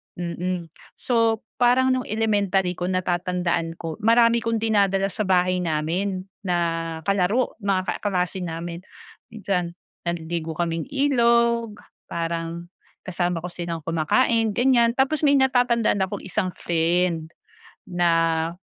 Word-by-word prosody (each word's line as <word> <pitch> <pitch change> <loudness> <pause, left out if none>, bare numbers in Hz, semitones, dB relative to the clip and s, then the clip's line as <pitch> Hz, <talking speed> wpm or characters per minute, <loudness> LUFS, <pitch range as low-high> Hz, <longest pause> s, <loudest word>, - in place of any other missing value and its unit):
mm. 175 0 -4 0.3
So, 230 -2 +1 0.2
parang 250 +2 +4
nung 255 -1 0
elementary 200 -4 0
ko, 175 - -1
natatandaan 175 -2 -1
ko 165 -2 -5
marami 230 +2 +4
akong 230 -1 -1
dinadala 200 -3 +2
sa 215 - -2
bahay 185 -1 +3
namin 180 +4 -1 0.2
na 180 -2 +1 0.5
kalaro, 200 +7 +1
mga 190 -1 0
kaklase 185 -2 -1
namin. 170 +2 -6 0.5
Minsan, 185 -5 -2 0.3
naliligo 165 -1 -3
kaming 165 0 -2
ilog, 235 -5 +2 0.3
parang 170 0 -4 0.3
kasama 175 -2 -2
ko 180 - -5
silang 170 -2 -5
kumakain, 220 - +1
ganiyan. 240 0 +3
Tapos 275 +4 +1
may 285 - +5
natatandaan 245 -5 +3
akong 190 - -6
isang 185 -1 -2
friend, 170 -1 0 0.5
na 165 -2 +1
185 Hz, 115 wpm, -23 LUFS, 170-230 Hz, 0.5 s, may